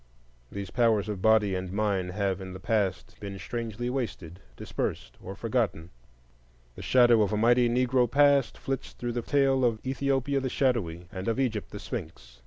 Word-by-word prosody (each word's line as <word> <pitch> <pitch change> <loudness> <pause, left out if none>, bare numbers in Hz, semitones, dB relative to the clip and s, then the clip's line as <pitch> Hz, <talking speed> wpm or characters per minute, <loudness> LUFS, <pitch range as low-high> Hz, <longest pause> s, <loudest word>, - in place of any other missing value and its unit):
These 100 -2 -6
powers 115 -4 +2
of 100 -3 -4
body 110 -2 +4
and 95 -1 -3
mind 100 -3 -1
have 100 -1 -1
in 95 -1 -7
the 95 - -8
past 100 -4 -1
been 100 -1 -6
strangely 115 +2 -4
wasted, 110 -9 -4 0.2
dispersed, - - -4
or 95 - -7
forgotten. 110 -8 -2 0.8
The - - -10
shadow 120 -3 +5
of 105 - +1
a 105 - 0
mighty 120 +2 +4
Negro 125 0 +2
past 140 -1 +3
flits 135 -1 -4
through 120 -1 -4
the 120 - -2
tale 135 0 +2
of 115 -2 +2
Ethiopia 135 +1 0
the 130 -1 -2
Shadowy 100 -12 0
and 95 +2 -6
of 115 +3 0
Egypt 115 -6 -1
the - - -8
Sphinx. - - -8
115 Hz, 175 wpm, -28 LUFS, 95-125 Hz, 0.8 s, shadow